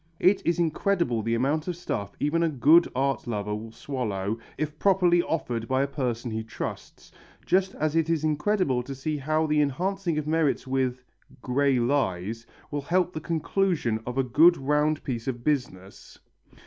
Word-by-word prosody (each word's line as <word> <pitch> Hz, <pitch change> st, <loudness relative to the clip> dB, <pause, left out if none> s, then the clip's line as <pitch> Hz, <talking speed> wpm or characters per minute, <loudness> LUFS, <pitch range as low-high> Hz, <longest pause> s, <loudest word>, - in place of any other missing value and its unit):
It 190 Hz, +2 st, +4 dB
is 170 Hz, +1 st, +1 dB
incredible 170 Hz, -, +1 dB
the 115 Hz, +2 st, 0 dB
amount 145 Hz, +7 st, 0 dB
of 180 Hz, -, -2 dB
stuff 105 Hz, -, -4 dB
even 150 Hz, +3 st, +1 dB
a 165 Hz, -, +2 dB
good 155 Hz, +5 st, +5 dB
art 135 Hz, 0 st, 0 dB
lover 105 Hz, -2 st, -2 dB
will 110 Hz, +2 st, -6 dB
swallow, 110 Hz, -5 st, -3 dB, 0.2 s
if 150 Hz, +1 st, -4 dB
properly 180 Hz, -3 st, +4 dB
offered 120 Hz, -9 st, -3 dB
by 130 Hz, +1 st, +2 dB
a -, -, -1 dB
person 125 Hz, -4 st, -3 dB
he 110 Hz, 0 st, -3 dB
trusts, 115 Hz, -, -7 dB, 0.3 s
just 190 Hz, +1 st, +1 dB
as 155 Hz, +1 st, -1 dB
it 165 Hz, 0 st, +2 dB
is 165 Hz, -2 st, +1 dB
incredible 155 Hz, -3 st, +1 dB
to 135 Hz, +3 st, -7 dB
see 150 Hz, +3 st, -3 dB
how 155 Hz, +3 st, 0 dB
the 150 Hz, -1 st, +2 dB
enhancing 175 Hz, +4 st, -1 dB
of 155 Hz, -, -2 dB
merits 155 Hz, -3 st, +1 dB
with 130 Hz, -1 st, -1 dB, 0.4 s
grey 135 Hz, +1 st, +2 dB
lies, 115 Hz, -4 st, -1 dB, 0.2 s
will 145 Hz, -1 st, -2 dB
help 180 Hz, +4 st, +1 dB
the 155 Hz, -, -5 dB
conclusion 160 Hz, -, 0 dB
of 125 Hz, +1 st, -4 dB
a 135 Hz, -, +3 dB
good 160 Hz, +8 st, +5 dB
round 150 Hz, +2 st, +1 dB
piece 120 Hz, -3 st, -4 dB
of 120 Hz, -2 st, -3 dB
business. 115 Hz, -10 st, -3 dB
145 Hz, 175 wpm, -26 LUFS, 120-165 Hz, 0.4 s, good